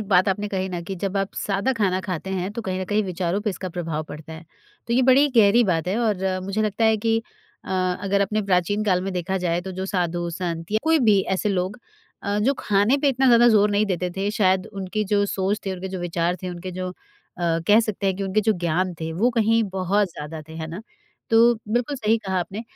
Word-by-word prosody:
बात 185 0 +4
आपने 205 +2 -1
कही 190 -1 -2
ना 175 -2 -4
कि 190 +3 -5
जब 195 +2 -3
आप 195 0 -2
सादा 200 +6 0
खाना 195 -6 0
खाते 190 -1 -5
हैं, 190 0 -2
तो 235 - -5
कहीं 185 -1 -3
न - - -2
कहीं 210 +2 +1
विचारों 185 +1 -2
पे 210 - -1
इसका 185 -1 -5
प्रभाव 165 -3 -3
पड़ता 155 +1 -9
है। 160 +1 -10 0.4
तो 235 - -2
ये 255 - +4
बड़ी 270 +3 +5
गहरी 225 +2 +6
बात 170 -2 0
है, 200 - 0
और 190 -5 0
मुझे 200 +3 -1
लगता 215 +2 0
है 220 0 +4
कि 225 +1 +1 0.5
अ, - - -12 0.3
अगर 200 0 0
अपने 210 +2 0
प्राचीन 200 +2 +1
काल 185 -3 +2
में 195 0 -3
देखा 185 +2 -2
जाए, 175 -1 0
तो 190 +2 -7
जो 190 +1 -4
साधु-संत 175 -1 -2
या 215 - +3
कोई 320 0 +3
भी 200 -2 +5 0.2
ऐसे 210 - -1
लोग 190 +3 -1 0.4
अ, 205 0 -1
जो 260 +7 +2
खाने 210 +6 +2
पे 285 0 +2
इतना 265 0 +2
ज़्यादा 240 -1 +6
ज़ोर 210 -2 +4
नहीं 205 +1 +2
देते 180 -2 -1
थे, 195 +1 0
शायद 190 -3 +2
उनकी 195 +2 -3
जो 205 0 +2
सोच 195 +2 -1
थे, 195 - -1
उनके 190 +1 -5
जो 185 - -5
विचार 175 0 -1
थे, 185 - -3
उनके 175 +1 -6
जो 185 +1 -4
अ, - - -9 0.8
कह 210 +2 +7
सकते 215 -3 -3
हैं 190 - +1
कि 200 - -4
उनके 195 +2 +1
जो 220 +1 +2
ज्ञान 175 +2 0
थे, 160 0 -3
वो 220 +9 +2
कहीं 225 -1 +2
बहुत 190 +1 +1
ज़्यादा 155 +2 -7
थे, 160 +1 -14
है 160 - -4
ना। 165 +5 -7 0.5
तो 225 - +5 0.3
बिल्कुल 245 +4 0
सही 220 -2 +2
कहा 190 -1 -1
आपने। 195 +6 -5
195 Hz, 235 wpm, -23 LUFS, 180-215 Hz, 0.8 s, कह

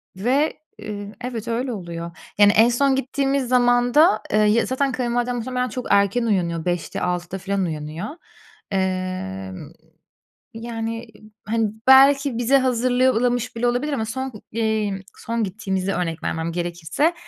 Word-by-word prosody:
ve, 260 +10 +1 0.3
ııı, 205 -1 -6
evet, 240 -3 -5
öyle 245 +2 -1
oluyor. 170 -4 -6 0.3
Yani, 205 -1 +7
en 225 +3 +5
son 270 +3 +2
gittiğimiz 270 0 0
zaman 245 0 +3
da, 300 -8 +5
eee, 215 - +4
ya 215 +2 +3
zaten 270 +1 0
kayınvalidem 245 -1 -1
muhtemelen 250 +1 -2
çok 250 +3 -5
erken 200 +4 +3
uyanıyor, 170 -6 0
5'te, 175 -1 -2
6'da 180 +1 -2
filan 195 +1 -1
uyanıyor. 155 +3 -5 0.6
Eee, 185 - -2 1.0
yani, 230 0 -5 0.4
hani, 220 0 0 0.2
belki 275 -1 +6
bize 250 +3 +4
hazırlamış 250 -1 +1
bile 240 - 0
olabilir. 250 +5 0
Ama 225 -6 -1
son, 260 +4 -4 0.2
eee, 215 -3 -1 0.2
son 230 -1 -2
gittiğimizi 195 -1 -2
örnek 165 -2 -3
vermem 165 +1 -2
gerekirse, 175 - -1
225 Hz, 135 wpm, -22 LUFS, 190-250 Hz, 1.0 s, Yani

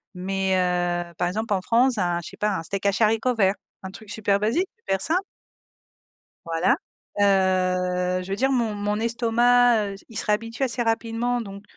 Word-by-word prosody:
mais 190 +1 -1
heu, 175 -1 0
par 175 - 0
exemple, 210 +3 -2
en 185 - -2
France, 240 +1 +3
un, 175 -3 0
je - - -7
sais - - -14
pas, 210 0 0
un - - -4
steak 200 +3 -4
haché 200 +3 +2
haricots 225 +4 +2
verts, 195 -2 +3 0.3
un 190 - -5
truc 210 +1 -12
super 205 -2 +1
basique, 240 - 0
super 195 - -2
simple. 345 - +1 1.2
Voilà, 165 +7 +2 0.4
heu, 185 -2 +2
je 185 - -9
veux 195 - -1
dire 265 +6 +1
mon 235 -5 +1
mon 205 +1 -1
estomac, 235 -1 +3
heu, - - -8
il 225 - -8
se - - -3
réhabitue 230 +4 -1
assez 250 -1 -1
rapidement, 230 +2 -1
donc 200 -2 -8
205 Hz, 185 wpm, -24 LUFS, 185-230 Hz, 1.2 s, France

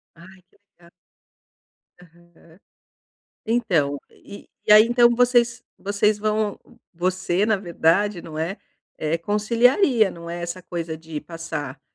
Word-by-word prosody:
Ai 185 +2 -16
que - - -31 0.2
legal. 170 0 -21 1.1
Aham, 170 0 -21 0.9
então 180 -12 0
e 200 - -14 0.2
e - - +6
aí 215 +1 +9
então 240 +1 +4
vocês 245 -1 +2 0.2
vocês 205 +1 0
vão 215 0 -1 0.3
você 185 +2 -1
na 220 -2 +2
verdade, 175 +1 0
não 155 -1 -8
é, 170 +5 -3 0.4
é 155 +2 -1
conciliaria, 230 - +2
não 170 0 -10
é 175 0 -5
essa 175 +1 -6
coisa 165 -2 -5
de 160 -1 -7
passar, 155 -5 -7
185 Hz, 125 wpm, -22 LUFS, 165-215 Hz, 1.1 s, aí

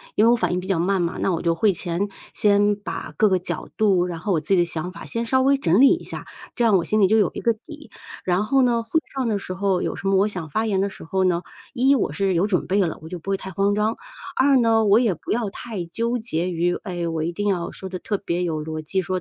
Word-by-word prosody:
因 215 - +4
为 235 - +6
我 - - +5
反 235 - 0
应 180 - 0
比 185 - -7
较 190 -3 +1
慢 190 +2 +1
嘛， 170 0 -2
那 190 - +1
我 165 - -1
就 170 -1 +1
会 210 +4 +3
前 180 +2 -2 0.2
先 205 0 +3
把 205 - -6
各 215 -2 +4
个 185 -1 +2
角 175 -3 -5
度， 195 -5 +3
然 170 -2 -5
后 195 +4 -1
我 160 - +1
自 155 - -11
己 195 - +4
的 175 - +4
想 170 +1 -4
法 - - -10
先 230 - -3
稍 260 +3 +2
微 275 +1 +4
整 185 -6 +2
理 275 +7 +7
一 - - -9
下， - - -7 0.3
这 240 - +1
样 220 -3 +5
我 180 - +3
心 215 +4 0
里 195 - +5
就 220 +3 +3
有 205 -6 +3
一 - - -5
个 230 - +2
底。 295 +6 -13 0.4
然 180 +2 +1
后 270 +4 +2
呢， 235 -2 +2
会 315 +8 +1 0.2
上 260 -3 0
的 210 -2 0
时 185 - -5
候 190 -1 0
有 - - -2
什 195 - -2
么 195 - +3
我 200 +2 +3
想 180 -7 -6
发 220 +9 -1
言 195 -3 +1
的 200 - 0
时 190 - -11
候 190 +3 0
呢， 175 -2 +2 0.3
一 270 +1 +4
我 - - 0
是 195 -2 0
有 175 +2 +2
准 190 -4 0
备 195 +2 +1
了， 170 -4 -1
我 160 - -10
就 180 - -6
不 175 +3 -9
会 195 - +1
太 190 - -8
慌 195 +3 +1
张； 210 +2 +1 0.4
二 270 +1 +4
呢， 225 -2 +3
我 210 +2 +5
也 230 -6 +2
不 165 - -7
要 225 -3 0
太 200 -3 -6
纠 230 +8 -2
结 185 -6 -2
于， 175 +1 0
哎， 175 -4 -3
我 165 -1 -2
一 170 - -1
定 205 +4 -3
要 180 -4 -1
说 190 - -8
得 185 - -5
特 205 +3 -2
别 180 -2 -2
有 160 -3 -2
逻 155 0 -5
辑、 190 +5 -1
说 185 +1 -3
195 Hz, 315 characters per minute, -23 LUFS, 175-220 Hz, 0.4 s, 理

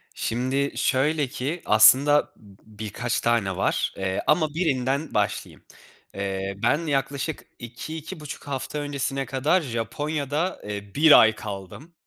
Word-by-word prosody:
Şimdi 130 +4 -1
şöyle 145 +2 +1
ki, 145 +6 -4
aslında 135 +7 +5 0.3
birkaç 110 +2 -4
tane 115 -6 +1
var. 95 - 0
Eee, 95 -1 -2
ama 155 0 +3
birinden 140 -3 -1
başlayayım. - - -2 0.5
Eee, 95 0 -3
ben 160 +2 +2
yaklaşık 140 +2 -2 0.2
2-2,5 150 +7 -8
hafta 140 +1 -4
öncesine 140 -1 -2
kadar 145 +8 +1
Japonya'da, 145 +6 -3
eee, 100 -1 -6
1 155 +1 +8
ay 110 -1 +5
kaldım. 105 - -8
135 Hz, 115 wpm, -24 LUFS, 110-150 Hz, 0.5 s, 1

